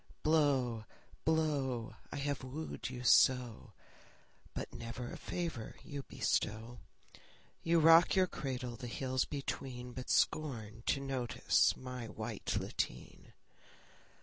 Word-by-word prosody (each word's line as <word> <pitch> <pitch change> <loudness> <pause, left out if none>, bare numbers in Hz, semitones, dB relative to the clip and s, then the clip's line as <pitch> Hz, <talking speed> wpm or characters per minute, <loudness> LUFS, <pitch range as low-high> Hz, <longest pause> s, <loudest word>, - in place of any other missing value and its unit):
Blow, 135 -8 +2 0.4
blow! 140 -8 +1 0.2
I - - -5
have 140 -2 -2
wooed 140 +3 -5
you 125 -1 -6
so, 125 -1 +4 0.8
But - - -4
never 120 +1 -6
a - - -6
favour 165 -11 -4
you 145 -3 -5
bestow. 115 -1 -1 0.8
You 165 +1 +3
rock 165 +3 +7
your 190 -1 +5
cradle 125 -7 -4
the 125 +1 -7
hills 130 +2 0
between, 130 -3 -4
But 130 +1 -7
scorn 115 -8 +1
to - - +3
notice 135 -3 +2
my 125 -2 -6
white 110 -1 -3
lateen. 60 - -4
130 Hz, 115 wpm, -35 LUFS, 120-145 Hz, 0.8 s, rock